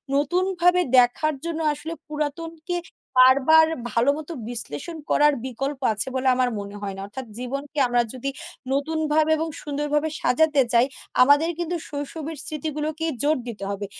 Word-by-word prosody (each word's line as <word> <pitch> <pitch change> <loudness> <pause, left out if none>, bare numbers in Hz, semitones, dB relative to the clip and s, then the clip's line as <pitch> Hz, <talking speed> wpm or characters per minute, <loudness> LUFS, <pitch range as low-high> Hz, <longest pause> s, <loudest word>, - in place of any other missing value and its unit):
নতুনভাবে 355 +4 +2 0.2
দেখার 250 +5 +4
জন্য 330 -1 -3
আসলে 305 +3 -6
পুরাতনকে 315 +3 -4 0.4
বারবার 275 +5 +7 0.2
ভালোমত 280 +8 +1 0.2
বিশ্লেষণ 245 - -5
করার 295 0 +4
বিকল্প 270 +3 -4
আছে 215 - -1
বলে 260 0 0
আমার 250 -1 +2
মনে 200 0 -7
হয় 195 -1 -4
না। 195 - -7
অর্থাৎ 255 +6 -7
জীবনকে 275 +4 -5
আমরা 245 0 +2
যদি 260 +2 -3 0.4
নতুনভাবে 310 +2 +1
এবং 320 +1 -2
সুন্দরভাবে 295 +1 -1
সাজাতে 295 +3 +3
চাই 235 +1 +5 0.4
আমাদের 285 +5 +5
কিন্তু 345 0 -2
শৈশবের 300 +2 -5
স্মৃতিগুলোকে 310 +1 -3 0.2
জোর 300 +2 +2
দিতে 210 -4 -6
হবে। 200 0 -4
295 Hz, 135 wpm, -24 LUFS, 255-315 Hz, 0.4 s, বারবার